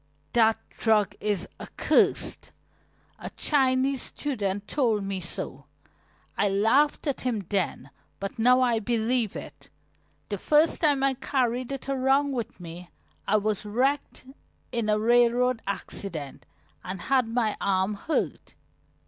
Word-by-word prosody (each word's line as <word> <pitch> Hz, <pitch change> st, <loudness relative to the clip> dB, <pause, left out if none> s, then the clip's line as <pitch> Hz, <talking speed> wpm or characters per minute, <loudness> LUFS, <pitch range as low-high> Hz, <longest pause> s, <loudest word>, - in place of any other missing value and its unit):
"That 225 Hz, -1 st, +4 dB
drug 215 Hz, -3 st, +2 dB
is 205 Hz, -4 st, -1 dB
accursed -, -, +1 dB, 0.7 s
a -, -, -6 dB
Chinese 265 Hz, -2 st, +2 dB
student 205 Hz, -8 st, -3 dB
told 230 Hz, -8 st, +1 dB
me 195 Hz, -1 st, -3 dB
so. 170 Hz, -2 st, -5 dB, 0.7 s
I 205 Hz, -, +2 dB
laughed 225 Hz, +12 st, +2 dB
at 285 Hz, -3 st, -1 dB
him 225 Hz, -6 st, -2 dB
then, 180 Hz, -8 st, -2 dB, 0.3 s
but 195 Hz, +4 st, -5 dB
now 250 Hz, +3 st, +5 dB
I 240 Hz, -3 st, +2 dB
believe 230 Hz, 0 st, 0 dB
it. -, -, -9 dB, 0.6 s
The 205 Hz, -2 st, -3 dB
first 305 Hz, -, +3 dB
time 290 Hz, -4 st, +3 dB
I 275 Hz, 0 st, +3 dB
carried 255 Hz, -1 st, -1 dB
it 275 Hz, -1 st, -5 dB
around 275 Hz, +1 st, +2 dB
with 240 Hz, -5 st, -4 dB
me 175 Hz, +1 st, -9 dB, 0.4 s
I 215 Hz, -, +4 dB
was 210 Hz, -1 st, -1 dB
wrecked 255 Hz, +7 st, -1 dB, 0.5 s
in 235 Hz, -3 st, -1 dB
a 210 Hz, -, +3 dB
railroad 240 Hz, +2 st, +3 dB
accident 170 Hz, -7 st, -4 dB, 0.4 s
and 185 Hz, 0 st, -6 dB
had 260 Hz, 0 st, +2 dB
my 225 Hz, -2 st, 0 dB
arm 190 Hz, +1 st, +1 dB
hurt. 255 Hz, +10 st, -3 dB
230 Hz, 130 wpm, -26 LUFS, 205-260 Hz, 0.7 s, now